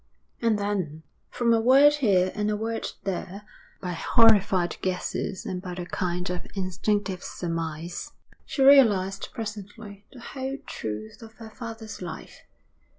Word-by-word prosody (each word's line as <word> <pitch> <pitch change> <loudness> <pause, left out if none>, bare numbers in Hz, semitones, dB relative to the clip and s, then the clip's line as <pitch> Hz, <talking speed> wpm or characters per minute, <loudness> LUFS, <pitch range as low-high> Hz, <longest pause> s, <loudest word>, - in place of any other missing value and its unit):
And 230 -2 +3
then, 185 -7 -2 0.3
from 235 -1 +2
a 225 - +3
word 275 +5 +7
here 190 -8 +3
and 210 0 -1
a 210 - 0
word 225 +1 -2 0.2
there, 195 +1 -4 0.4
by 180 - -3
horrified 195 -2 +4
guesses 185 +1 -2
and 180 -1 -3
by 180 -1 -6
a 175 0 -5
kind 180 0 -2
of 180 -1 -5
instinctive 190 0 -1
surmise, 165 0 -4 0.3
she 270 - -1
realised 205 -9 +5
presently 210 -1 -8
the 250 - -12
whole 265 +2 -5
truth 110 0 -6
of 225 -1 -11
her 225 -1 -11
father's 225 -3 -8
life. 175 -3 -8
200 Hz, 140 wpm, -26 LUFS, 180-225 Hz, 0.4 s, word